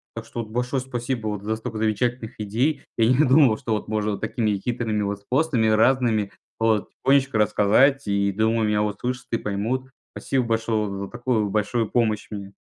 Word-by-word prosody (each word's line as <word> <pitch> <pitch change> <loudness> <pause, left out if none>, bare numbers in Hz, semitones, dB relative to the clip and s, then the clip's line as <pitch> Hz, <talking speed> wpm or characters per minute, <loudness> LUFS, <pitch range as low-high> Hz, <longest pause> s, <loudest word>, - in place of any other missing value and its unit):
Так 115 0 -6
что, 120 - -5
вот, 110 - -9
большое 125 +3 -1
спасибо, 125 -2 -3
вот 105 -1 -4
за 110 +1 -1
столько 115 0 -6
замечательных 110 +2 -1
идей, 120 +8 0
я 115 - +4
не 130 +5 +4
думал, 130 -5 +5
что 120 -5 -3
вот 105 - -3
можно 105 0 -1
вот 100 - -5
такими 110 -1 0
хитрыми 115 -1 -2
вот 100 0 -3
способами, 125 0 +1
разными, 110 -2 +2 0.3
вот 110 -2 +1
тихонечко 135 -3 +2
рассказать, 110 +6 +3
и, 100 0 +1
думаю, 110 +2 +1
меня 105 0 +1
услышат 125 +4 -3
и 115 - +2
поймут. 115 +6 -3 0.2
Спасибо 130 -2 -1
большое 110 -2 0
вот 100 - -5
за - - -9
такую 120 -3 -1
большую 110 +2 0
помощь 110 -3 0
мне. 100 -1 -7
110 Hz, 185 wpm, -23 LUFS, 105-125 Hz, 0.3 s, думал